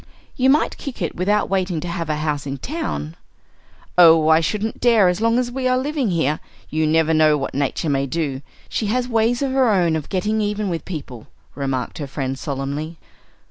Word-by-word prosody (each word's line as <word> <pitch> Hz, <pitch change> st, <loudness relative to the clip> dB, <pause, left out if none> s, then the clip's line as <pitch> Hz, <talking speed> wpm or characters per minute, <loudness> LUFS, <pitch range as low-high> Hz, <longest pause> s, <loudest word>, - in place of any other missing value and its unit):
"You 260 Hz, +1 st, +3 dB
might 295 Hz, +4 st, +2 dB
kick 275 Hz, -6 st, -7 dB
it 170 Hz, -5 st, -3 dB
without 205 Hz, +4 st, +1 dB
waiting 185 Hz, -3 st, -1 dB
to 175 Hz, -, -5 dB
have 170 Hz, -2 st, -4 dB
a 155 Hz, -, +1 dB
house 150 Hz, -2 st, -2 dB
in 135 Hz, 0 st, -4 dB
town." 105 Hz, -, -4 dB, 0.8 s
"Oh, 165 Hz, -2 st, +7 dB
I 160 Hz, 0 st, +6 dB
shouldn't 210 Hz, +6 st, -2 dB
dare 230 Hz, -6 st, +5 dB
as 180 Hz, +4 st, -2 dB
long 230 Hz, +1 st, +3 dB
as 245 Hz, -1 st, 0 dB
we 260 Hz, 0 st, -1 dB
are 255 Hz, 0 st, +2 dB
living 275 Hz, -2 st, -1 dB
here! 160 Hz, -4 st, 0 dB, 0.3 s
You 155 Hz, 0 st, +1 dB
never 160 Hz, +1 st, +3 dB
know 155 Hz, -1 st, +4 dB
what 135 Hz, -, -4 dB
Nature 140 Hz, +3 st, -1 dB
may 140 Hz, 0 st, 0 dB
do. 140 Hz, -2 st, -2 dB, 0.3 s
She 215 Hz, -, -2 dB
has 245 Hz, +3 st, 0 dB
ways 235 Hz, +2 st, +1 dB
of 270 Hz, -, -1 dB
her 260 Hz, -2 st, +3 dB
own 175 Hz, -6 st, +2 dB
of 155 Hz, -2 st, -4 dB
getting 210 Hz, +4 st, 0 dB
even 210 Hz, -1 st, -1 dB
with 170 Hz, -2 st, -4 dB
people," 135 Hz, -, -7 dB, 0.3 s
remarked 135 Hz, -1 st, -3 dB
her 145 Hz, -, -4 dB
friend, 135 Hz, -1 st, -4 dB
solemnly. 145 Hz, +3 st, -4 dB
170 Hz, 200 wpm, -21 LUFS, 150-220 Hz, 0.8 s, Oh